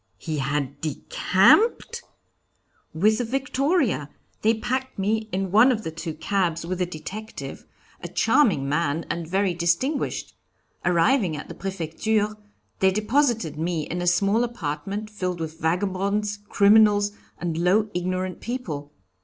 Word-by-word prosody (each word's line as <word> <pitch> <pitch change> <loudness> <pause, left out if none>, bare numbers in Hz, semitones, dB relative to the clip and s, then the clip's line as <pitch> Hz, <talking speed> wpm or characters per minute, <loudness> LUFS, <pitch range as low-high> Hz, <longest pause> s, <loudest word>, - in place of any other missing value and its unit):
"He 155 -3 -4
had 140 0 -2
decamped?" 270 - +2 0.9
"With 215 +6 +2
the - - +1
victoria. 270 - 0 0.3
They 225 +2 +3
packed 260 +4 -3
me 215 +3 -1
in 190 0 -2
one 220 +6 +6
of 225 -3 -2
the 160 - -4
two 160 0 -6
cabs 170 -1 -1
with 185 +1 -3
the 180 - +1
detective, 190 +7 -8 0.3
a - - -5
charming 225 - +2
man 150 +2 0
and 170 -1 -4
very 190 +1 +1
distinguished. 175 - -1 0.5
Arriving 180 - +2
at 145 - -8
the - - -6
Prefecture, 200 +4 -1 0.4
they 190 - +5
deposited 215 - +1
me 165 -1 -1
in 175 +1 -4
a 175 - -2
small 200 +6 +3
apartment 200 -1 -4
filled 180 -4 -3
with 160 0 -5
vagabonds, 200 +4 0
criminals, 205 0 +5 0.3
and 165 -2 -3
low, 205 +5 +2
ignorant 185 0 -2
people. 160 - -5
190 Hz, 135 wpm, -24 LUFS, 165-220 Hz, 0.9 s, one